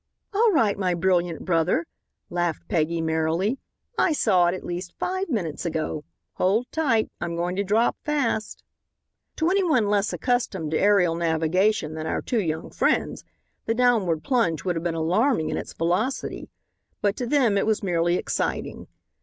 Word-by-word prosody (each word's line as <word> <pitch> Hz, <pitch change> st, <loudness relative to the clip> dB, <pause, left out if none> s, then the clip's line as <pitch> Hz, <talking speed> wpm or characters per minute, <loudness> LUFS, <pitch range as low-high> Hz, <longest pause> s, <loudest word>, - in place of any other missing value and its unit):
"All 440 Hz, +2 st, +4 dB
right, 220 Hz, -, +2 dB
my 180 Hz, -2 st, +1 dB
brilliant 175 Hz, -2 st, 0 dB
brother," 170 Hz, -1 st, +1 dB, 0.5 s
laughed 175 Hz, -2 st, -2 dB
Peggy 165 Hz, -2 st, 0 dB
merrily. 160 Hz, +9 st, 0 dB, 0.4 s
"I 330 Hz, -, +3 dB
saw 185 Hz, -11 st, +3 dB
it 175 Hz, -, +1 dB
at -, -, -8 dB
least 175 Hz, 0 st, -5 dB
five 375 Hz, +1 st, -2 dB
minutes 175 Hz, -, -2 dB
ago. 155 Hz, -3 st, -3 dB, 0.3 s
Hold 205 Hz, +6 st, +2 dB
tight, 260 Hz, -9 st, +1 dB
I'm 170 Hz, -1 st, -3 dB
going 175 Hz, +2 st, -2 dB
to 200 Hz, -, +1 dB
drop 215 Hz, +4 st, +2 dB
fast." 275 Hz, -8 st, -1 dB, 0.7 s
To 320 Hz, +3 st, +1 dB
any 390 Hz, 0 st, +3 dB
one 260 Hz, -, +3 dB
less 205 Hz, 0 st, +1 dB
accustomed 210 Hz, -, -1 dB
to 160 Hz, -, +1 dB
aerial 200 Hz, -4 st, +4 dB
navigation 165 Hz, +2 st, +1 dB
than 160 Hz, 0 st, -5 dB
our -, -, -2 dB
two 235 Hz, -4 st, 0 dB
young 160 Hz, -3 st, -3 dB
friends, -, -, 0 dB, 0.4 s
the 225 Hz, -, +1 dB
downward 220 Hz, -10 st, +2 dB
plunge 230 Hz, -, +1 dB
would 180 Hz, -2 st, 0 dB
have 165 Hz, -, -2 dB
been 170 Hz, -1 st, -2 dB
alarming 175 Hz, -, +1 dB
in -, -, -2 dB
its -, -, -5 dB
velocity. 180 Hz, +11 st, -1 dB, 0.5 s
But 205 Hz, 0 st, +1 dB
to 245 Hz, -, -3 dB
them 250 Hz, -6 st, +3 dB
it 200 Hz, -, +1 dB
was 220 Hz, -1 st, +1 dB
merely 175 Hz, -2 st, +1 dB
exciting. -, -, -3 dB
185 Hz, 165 wpm, -24 LUFS, 165-230 Hz, 0.7 s, All